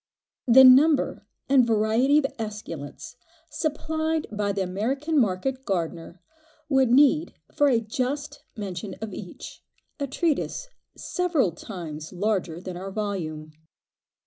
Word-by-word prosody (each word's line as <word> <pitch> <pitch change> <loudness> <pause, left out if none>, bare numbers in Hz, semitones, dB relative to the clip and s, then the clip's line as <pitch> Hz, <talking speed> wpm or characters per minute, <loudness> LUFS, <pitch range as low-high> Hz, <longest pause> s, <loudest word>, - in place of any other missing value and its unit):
The 260 +2 +8
number 275 +3 +5 0.2
and 265 -2 +5
variety 230 +5 +3
of 300 - +3
esculents 210 - -7 0.3
supplied 315 +1 -2
by 205 -1 -1
the 195 -1 -1
American 265 - -1
market 255 +5 0
gardener 170 -3 -3 0.5
would 265 -3 +3
need 290 +5 +4 0.2
for 290 - +3
a 245 -4 +3
just 255 +6 -4
mention 195 -1 -5
of 220 -3 -6
each, 180 -3 -9 0.4
a 280 - -2
treatise 330 - -1 0.3
several 335 - 0
times 165 -4 -8
larger 185 -3 -1
than 180 -1 -7
our 190 +2 -6
volume. 175 -7 -4
220 Hz, 120 wpm, -25 LUFS, 185-280 Hz, 0.5 s, The